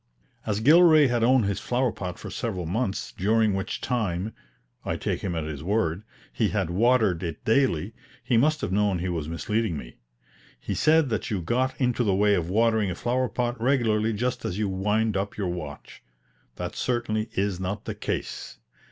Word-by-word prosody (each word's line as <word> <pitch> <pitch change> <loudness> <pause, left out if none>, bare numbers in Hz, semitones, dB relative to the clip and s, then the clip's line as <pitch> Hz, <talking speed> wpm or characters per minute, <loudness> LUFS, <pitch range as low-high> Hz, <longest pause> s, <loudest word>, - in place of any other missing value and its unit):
As 105 0 0
Gilray 155 +3 +7
had 120 -1 +1
owned 125 -1 +4
his 100 0 -1
flower 125 0 0
pot 90 -4 -6
for 105 - -8
several 100 -6 -3
months, 100 +3 -2
during 110 +2 +2
which 95 0 -3
time 105 -5 -1 0.5
(I - - -2
take - - -2
him 90 -3 -2
at 80 - -2
his 75 -2 -5
word) 90 -2 0 0.3
he - - +1
had 85 - -1
watered 110 -3 +3
it 85 -4 -5
daily, 110 - +2 0.3
he 125 - +1
must 150 +6 +3
have - - -2
known 100 -1 +2
he 90 +2 -2
was 80 -4 -3
misleading 105 +1 -1
me. - - -10 0.6
He - - -4
said 155 -2 +3
that 110 - -2
you 105 - -1
got 125 +9 -1
into 125 -2 +1
the 100 -4 +2
way 105 +1 +3
of 85 -3 0
watering 110 0 +2
a 90 - -3
flower 125 +3 0
pot 120 +1 -2
regularly 115 -4 +2
just 125 +3 -2
as 90 - -3
you 105 -1 0
wind 105 +3 0
up 100 +1 -2
your 100 -4 -1
watch. 75 -5 -7 0.5
That 90 0 -5
certainly 115 -3 -1
is 95 -2 -1
not 95 +2 -4
the - - -3
case. - - -5
105 Hz, 185 wpm, -26 LUFS, 90-120 Hz, 0.6 s, Gilray